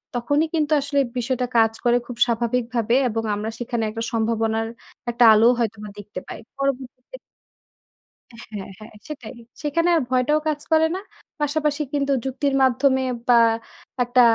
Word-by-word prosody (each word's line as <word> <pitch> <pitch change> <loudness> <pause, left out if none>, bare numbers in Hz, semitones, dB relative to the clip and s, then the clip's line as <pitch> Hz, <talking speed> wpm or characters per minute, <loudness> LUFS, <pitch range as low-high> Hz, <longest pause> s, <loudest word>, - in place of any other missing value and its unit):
তখনই 285 +6 +1
কিন্তু 310 -1 0
আসলে 285 0 0 0.2
বিষয়টা 250 +1 -1
কাজ 225 -1 +5
করে 240 0 +4
খুব 245 - -7
স্বাভাবিকভাবে 235 0 0
এবং 225 0 -2
আমরা 215 +2 -3
সেখানে 240 -1 -2
একটা 225 +1 -4
সম্ভাবনার 225 -1 0 0.4
একটা 240 +1 +2
আলোও 225 +3 +6
হয়তোবা 215 -2 -3
দেখতে 205 -2 -7
পাই। - - -7 0.2
পরবর্তীতে 270 - -4 1.3
হ্যাঁ, 200 -3 -6
হ্যাঁ 215 +1 -12
সেটাই। 275 -7 -8 0.3
সেখানে 335 +4 +1
আর 320 - +3
ভয়টাও 260 +4 +2
কাজ 300 -1 -1
করে 320 0 +5
না। - - -3 0.4
পাশাপাশি 295 0 0
কিন্তু 280 -1 0
যুক্তির 270 +1 -1
মাধ্যমে 265 +1 +3 0.3
বা 245 - +6 0.7
একটা 245 +1 +3
250 Hz, 140 wpm, -22 LUFS, 225-285 Hz, 1.3 s, আলোও